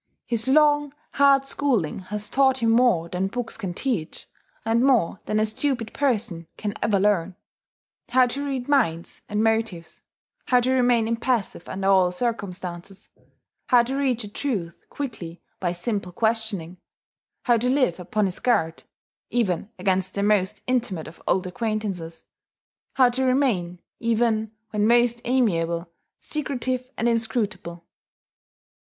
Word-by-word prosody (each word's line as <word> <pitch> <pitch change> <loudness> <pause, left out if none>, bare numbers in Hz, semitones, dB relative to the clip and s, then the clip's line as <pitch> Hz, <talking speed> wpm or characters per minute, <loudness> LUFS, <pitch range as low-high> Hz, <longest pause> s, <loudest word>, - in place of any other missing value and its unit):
His 235 0 -2
long, 295 0 +3 0.2
hard 275 -1 +4
schooling 250 - 0
has 210 0 -4
taught 265 -1 +3
him 230 -3 +2
more 230 -8 +3
than 180 +2 -1
books 240 +3 -4
can 190 -6 -5
teach, 225 - -3 0.4
and 230 +2 +2
more 240 -10 +3
than 215 - +1
a 215 - +3
stupid 230 0 -2
person 215 - -1
can 205 -1 -3
ever 205 -3 +2
learn: 190 -3 +1 0.7
how 255 +1 +5
to 270 +4 -4
read 270 -3 -3
minds 220 - 0
and 210 +1 0
motives, 220 -7 -1 0.4
how 250 - +4
to 255 +2 +1
remain 245 -3 +3
impassive 230 -5 -1
under 195 0 -2
all 190 -2 +4
circumstances, 190 -3 -4 0.6
how 245 -2 +5
to 260 +3 -3
reach 260 -4 0
a - - -6
truth 205 -7 -3 0.2
quickly 180 -12 -6 0.2
by 175 -2 0
simple 180 +1 -3
questioning, 215 -4 -1 0.7
how 240 -2 +4
to 245 +3 0
live 255 -10 +2
upon 205 +4 0
his 185 -2 -3
guard 165 -10 +1 0.5
(even 205 -5 0
against 190 -1 0
the 200 - 0
most 205 -2 +1
intimate 235 -10 -1
of 160 - -13
old 185 0 +2
acquaintances), 195 -5 -4 0.7
how 260 -2 +5
to 250 +2 -1
remain, 240 -10 +1 0.2
even 225 -2 +1 0.2
when 210 0 +1
most 240 0 +3
amiable, 170 -9 +1 0.3
secretive 255 -4 -3
and 230 - +1
inscrutable. 215 -7 -2
220 Hz, 140 wpm, -24 LUFS, 185-250 Hz, 0.7 s, how